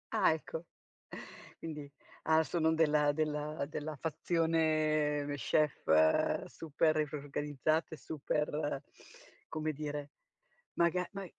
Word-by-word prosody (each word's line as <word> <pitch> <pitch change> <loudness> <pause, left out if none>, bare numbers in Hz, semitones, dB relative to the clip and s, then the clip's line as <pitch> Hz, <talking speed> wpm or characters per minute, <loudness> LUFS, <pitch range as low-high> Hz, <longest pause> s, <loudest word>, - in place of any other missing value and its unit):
Ah - - +5
ecco. 160 0 -5 1.0
Quindi 150 -3 -6 0.3
ah, 160 0 +4
sono 160 0 +1
della 150 -2 +3
del 150 -1 -1
della 155 0 -4
fazione, 155 -1 +1
ehm, 145 0 -3
chef 115 - +3
super 155 0 0 0.2
organizzate 145 +2 -1
e - - -6
super, 150 -1 -2 0.6
come 155 0 -2
dire, 145 -1 -5 0.6
maga 170 +1 +2
ma 195 -1 -5
155 Hz, 100 wpm, -33 LUFS, 145-160 Hz, 1.0 s, Ah